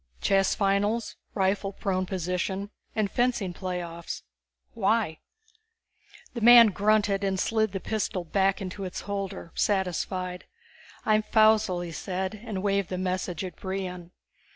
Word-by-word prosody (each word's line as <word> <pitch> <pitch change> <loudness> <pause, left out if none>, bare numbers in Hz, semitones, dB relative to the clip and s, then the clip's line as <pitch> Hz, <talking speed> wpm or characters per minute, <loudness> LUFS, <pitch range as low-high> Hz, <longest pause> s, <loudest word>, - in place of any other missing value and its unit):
"Chess 195 -1 +2
finals, 205 +3 +1 0.2
rifle 195 0 +1
prone 185 -1 -1
position, 190 +2 -2 0.2
and 210 -2 0
fencing 240 -7 0
playoffs. 175 -2 -5 0.5
Why?" 215 -6 +1 1.1
The 235 - -5
man 235 0 +9
grunted 205 0 +2
and 190 -1 0
slid 220 0 +1
the 195 - -3
pistol 195 -2 -2
back 195 +3 +1
into 190 +1 -6
its 185 -2 -5
holder, 195 -4 -5
satisfied. 185 -1 -1 0.6
"I'm 215 0 +4
Faussel," 215 -4 +3
he 170 - -6
said, 185 +3 -3
and 205 -5 -4
waved 200 -2 +1
the 185 - -3
message 185 -2 -2
at 180 - -7
Brion. 185 -2 -5
195 Hz, 130 wpm, -27 LUFS, 185-210 Hz, 1.1 s, man